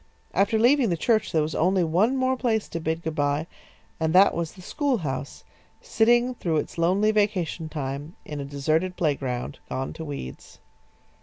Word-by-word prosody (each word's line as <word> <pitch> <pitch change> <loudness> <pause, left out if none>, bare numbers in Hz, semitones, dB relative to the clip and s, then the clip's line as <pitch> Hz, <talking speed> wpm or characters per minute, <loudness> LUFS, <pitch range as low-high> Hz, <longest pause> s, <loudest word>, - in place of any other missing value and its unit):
After 205 +3 +2
leaving 245 +1 +4
the 170 - 0
church 220 +5 +1
there 160 -2 +2
was 155 - -3
only 185 +2 +2
one 190 +11 +2
more 260 0 +2
place 230 -4 0
to 165 - -4
bid 160 +1 -2
good 160 - -3
bye, 145 +1 0 0.5
and 160 0 0
that 195 +2 +7
was 165 -2 -3
the 185 - -13
schoolhouse 170 - -2 0.4
sitting 240 +2 +3
through 170 -9 -1
its 150 - -3
lonely 190 +6 +3
vacation 195 -6 0
time 145 +2 -5
in 150 -1 -6
a 140 - -4
deserted 155 +6 0
playground, 135 -6 -2
gone 130 0 -3
to 160 - -7
weeds. 140 - -8
170 Hz, 170 wpm, -25 LUFS, 150-215 Hz, 0.5 s, that